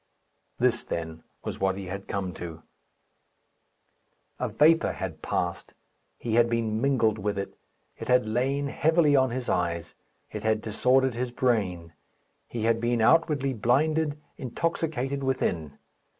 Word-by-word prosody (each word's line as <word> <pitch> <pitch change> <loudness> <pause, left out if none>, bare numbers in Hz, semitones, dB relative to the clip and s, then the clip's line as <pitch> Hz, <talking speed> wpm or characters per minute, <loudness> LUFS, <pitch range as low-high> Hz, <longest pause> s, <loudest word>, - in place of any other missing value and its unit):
This, - - +2
then, 80 -1 -5 0.2
was - - -5
what 95 0 +1
he 100 - -6
had 100 +2 -6
come 95 -2 -3
to. 80 -1 -8 1.8
A - - -1
vapour 165 +2 +4
had - - -6
passed. - - -3 0.4
He 115 - -3
had 120 0 +4
been 115 -2 0
mingled 115 -6 +2
with 105 0 -2
it. 100 - -4 0.5
It - - -6
had 125 -1 +4
lain 130 +6 0
heavily 160 -1 +3
on 130 -1 +4
his 125 +1 -4
eyes; 85 -2 -1 0.4
it - - -5
had 110 0 +1
disordered 125 +4 +2
his 125 +1 -2
brain. 100 -10 -1 0.5
He 115 -2 -4
had 115 0 +2
been 120 0 +1
outwardly 140 +1 +3
blinded, 150 +6 +1 0.2
intoxicated 140 -1 -2
within. 85 - -1
120 Hz, 135 wpm, -27 LUFS, 100-135 Hz, 1.8 s, vapour